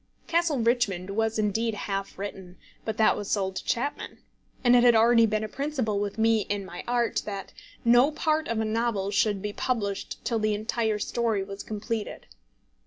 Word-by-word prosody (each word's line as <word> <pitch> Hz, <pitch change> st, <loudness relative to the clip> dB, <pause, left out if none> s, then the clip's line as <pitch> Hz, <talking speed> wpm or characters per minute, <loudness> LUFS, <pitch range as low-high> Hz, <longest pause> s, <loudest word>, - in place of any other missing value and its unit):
Castle 335 Hz, -3 st, +1 dB
Richmond 225 Hz, -6 st, +1 dB
was 220 Hz, +2 st, 0 dB
indeed 220 Hz, +1 st, 0 dB
half 195 Hz, -1 st, -4 dB
written, 190 Hz, -2 st, -7 dB, 0.3 s
but 220 Hz, -1 st, -3 dB
that 220 Hz, -, +4 dB
was 205 Hz, -, -5 dB
sold 190 Hz, -2 st, -1 dB
to -, -, -4 dB
Chapman. 280 Hz, +5 st, -2 dB, 0.5 s
And 245 Hz, -1 st, +6 dB
it 245 Hz, -, +6 dB
had 240 Hz, -1 st, +6 dB
already 230 Hz, 0 st, +5 dB
been 215 Hz, 0 st, -1 dB
a -, -, -2 dB
principle 260 Hz, -5 st, -2 dB
with 205 Hz, 0 st, -3 dB
me 225 Hz, 0 st, +3 dB
in 200 Hz, -1 st, -2 dB
my 175 Hz, -1 st, -8 dB
art, 240 Hz, -1 st, +1 dB
that 200 Hz, -2 st, -6 dB, 0.3 s
no 240 Hz, +4 st, +6 dB
part 310 Hz, 0 st, 0 dB
of 230 Hz, -1 st, -1 dB
a 220 Hz, -, 0 dB
novel 215 Hz, -3 st, -1 dB
should 205 Hz, -1 st, +1 dB
be 210 Hz, 0 st, -3 dB
published 205 Hz, -6 st, -2 dB
till 230 Hz, -2 st, 0 dB
the 215 Hz, -1 st, +1 dB
entire 220 Hz, 0 st, -1 dB
story 220 Hz, -1 st, -1 dB
was 195 Hz, +1 st, -7 dB
completed. 215 Hz, 0 st, -4 dB
220 Hz, 180 wpm, -27 LUFS, 205-235 Hz, 0.5 s, And